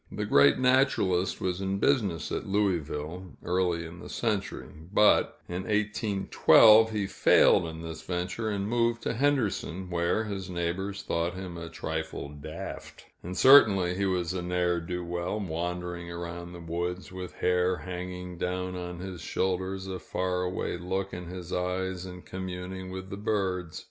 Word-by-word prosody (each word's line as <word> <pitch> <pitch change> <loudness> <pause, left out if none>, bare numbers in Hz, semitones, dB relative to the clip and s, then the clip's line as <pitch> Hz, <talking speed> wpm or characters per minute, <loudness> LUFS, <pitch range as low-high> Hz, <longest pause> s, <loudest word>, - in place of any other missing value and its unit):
The - - -3
great 70 0 +5
naturalist 125 -9 +2
was 90 0 -2
in 95 0 -1
business 100 - +1
at - - -3
Louisville, 90 -3 -1
early 90 -2 0
in 85 +2 -10
the - - -9
century; 110 -4 -2 0.2
but 105 0 +4
in 90 +1 -3
1812, 105 +1 +5
he 105 -2 -1
failed 95 -3 +4
in 80 0 -7
this 80 -1 -6
venture, 90 +6 -3
and 100 -1 -2
moved 115 +1 +1
to - - -1
Henderson, 110 - 0
where 85 +5 +1
his 100 -3 -5
neighbors 90 +3 -3
thought 85 +1 -1
him 90 -2 -6
a 85 -1 -6
trifle 80 -3 -4
daft, 75 +1 -8 0.2
and 90 +1 -6
certainly 100 -10 +7
he 100 +2 0
was 90 -2 0
a 95 - -2
ne'er 90 0 +1
do 90 +1 -4
well, 85 +4 -2
wandering 90 -1 -4
around 85 0 -6
the 85 - -9
woods, 85 +3 -3
with 95 -1 -7
hair 90 0 +2
hanging 90 +1 -6
down 90 0 -2
on 90 -1 -6
his 95 -2 -6
shoulders, 95 +1 -1
a 95 -1 -5
far 90 -1 -2
away 90 -1 -2
look 95 +2 -3
in 90 0 -6
his 90 0 -7
eyes, 90 0 -2
and 90 -1 -10
communing 95 0 -6
with 95 0 -7
the 100 - -4
birds. 95 -5 -1
90 Hz, 160 wpm, -28 LUFS, 85-95 Hz, 0.2 s, certainly